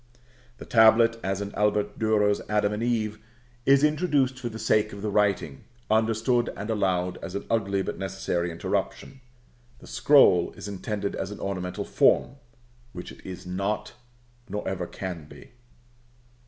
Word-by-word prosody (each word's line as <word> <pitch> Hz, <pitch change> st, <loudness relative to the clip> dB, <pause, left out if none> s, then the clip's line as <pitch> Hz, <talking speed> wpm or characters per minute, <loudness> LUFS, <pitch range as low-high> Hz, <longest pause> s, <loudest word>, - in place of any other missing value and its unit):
The -, -, -10 dB
tablet, 115 Hz, 0 st, +5 dB
as 95 Hz, +1 st, -1 dB
in 100 Hz, 0 st, -5 dB
Albert 105 Hz, 0 st, 0 dB
Durer's 105 Hz, -2 st, +2 dB
Adam 105 Hz, -1 st, +1 dB
and 105 Hz, -, -3 dB
Eve, 110 Hz, -3 st, -1 dB, 0.5 s
is 140 Hz, +1 st, +6 dB
introduced 150 Hz, -5 st, +2 dB
for 120 Hz, -2 st, -4 dB
the 110 Hz, -, -8 dB
sake 110 Hz, -1 st, +1 dB
of 100 Hz, 0 st, -8 dB
the 105 Hz, -, -1 dB
writing, 105 Hz, +4 st, 0 dB, 0.3 s
understood 115 Hz, +2 st, +2 dB
and 105 Hz, +3 st, -4 dB
allowed 90 Hz, -4 st, 0 dB
as 95 Hz, -, -6 dB
an 100 Hz, -, -4 dB
ugly 100 Hz, -4 st, +1 dB
but -, -, -5 dB
necessary 95 Hz, -2 st, -2 dB
interruption. 85 Hz, +9 st, -3 dB, 0.6 s
The -, -, -15 dB
scroll 135 Hz, -12 st, +4 dB
is -, -, -9 dB
extended 100 Hz, 0 st, -4 dB
as 95 Hz, -, -4 dB
an 105 Hz, -, -8 dB
ornamental 90 Hz, -2 st, -4 dB
form, 125 Hz, +3 st, +2 dB, 0.6 s
which 90 Hz, -1 st, -8 dB
it -, -, -15 dB
is 95 Hz, -1 st, -8 dB
not, 100 Hz, +4 st, -3 dB, 0.6 s
nor 105 Hz, +2 st, -4 dB
ever 95 Hz, -2 st, -3 dB
can 90 Hz, -5 st, -6 dB
be. -, -, -14 dB
105 Hz, 155 wpm, -26 LUFS, 95-115 Hz, 0.6 s, is